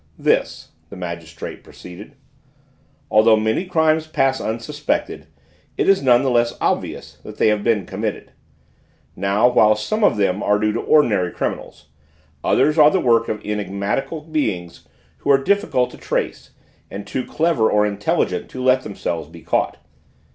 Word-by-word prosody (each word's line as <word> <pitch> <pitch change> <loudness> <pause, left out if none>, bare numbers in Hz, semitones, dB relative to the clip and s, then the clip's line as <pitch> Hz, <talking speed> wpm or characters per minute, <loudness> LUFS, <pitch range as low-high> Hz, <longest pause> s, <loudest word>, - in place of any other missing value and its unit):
"This," - - 0 0.2
the - - -10
magistrate 85 -3 -7
proceeded: 90 +4 -12 1.0
"although 110 +1 +5
many 110 - 0
crimes 160 -3 +1
pass 135 -4 0
unsuspected 130 +7 -3 0.5
it - - 0
is 195 0 +4
none 125 -1 +4
the 135 - +1
less 120 -1 +1
obvious - - -3
that - - -10
they - - +3
have 105 -1 0
been 105 -5 +1
committed; 105 +3 -5 0.8
now 100 +5 +2
while 110 -3 +4
some 215 - -2
of - - +3
them 100 -1 0
are 105 - +2
due 105 0 0
to - - -3
ordinary 105 - +2
criminals, 75 0 -5 0.5
others 155 +1 +2
are 150 0 +8
the 190 - +1
work 115 -6 +2
of 105 - -4
enigmatical 105 - -3
beings 110 - -3 0.3
who - - -5
are 140 - +7
difficult 140 -5 0
to - - -12
trace - - -3 0.4
and 100 +1 -7
too 130 +5 -3
clever 155 -8 +1
or 105 0 +3
intelligent 105 0 -1
to 130 - -6
let 130 0 +4
themselves 85 -8 -5
be 85 0 -13
caught. - - -1
110 Hz, 155 wpm, -20 LUFS, 100-140 Hz, 1.0 s, are